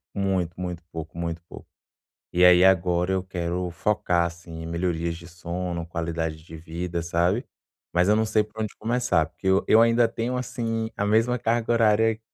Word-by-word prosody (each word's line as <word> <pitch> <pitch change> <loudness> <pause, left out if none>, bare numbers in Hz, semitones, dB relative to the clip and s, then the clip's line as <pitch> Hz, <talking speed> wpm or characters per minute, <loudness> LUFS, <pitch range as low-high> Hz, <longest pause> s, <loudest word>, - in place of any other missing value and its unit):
muito, 95 -4 0
muito 90 -2 -4
pouco, 80 0 -7
muito 85 0 -3
pouco. - - -11 0.7
E 90 - +3
aí 90 0 +8
agora, 90 0 +3
eu 95 -1 0
quero 90 -1 -3
focar 90 -2 +1
assim 85 -1 -7
em - - -6
melhorias 85 0 -2
de 85 +1 -12
sono, 85 0 -5
qualidade 80 -2 -3
de 80 0 -11
vida, 85 +1 -4
sabe. 85 +8 0 0.5
Mas 90 +2 +3
eu 105 - +5
não 110 - +2
sei 110 0 +2
por 110 +1 -8
onde 110 - -4
começar, 115 -8 +1
porque 95 - -7
eu 95 +1 +4
eu 110 - +6
ainda 115 0 +4
tenho 115 +2 -3
assim, 115 -3 -2
a 100 - 0
mesma 115 +4 +2
carga 115 0 0
horária 110 -1 +3
90 Hz, 180 wpm, -25 LUFS, 85-110 Hz, 0.7 s, aí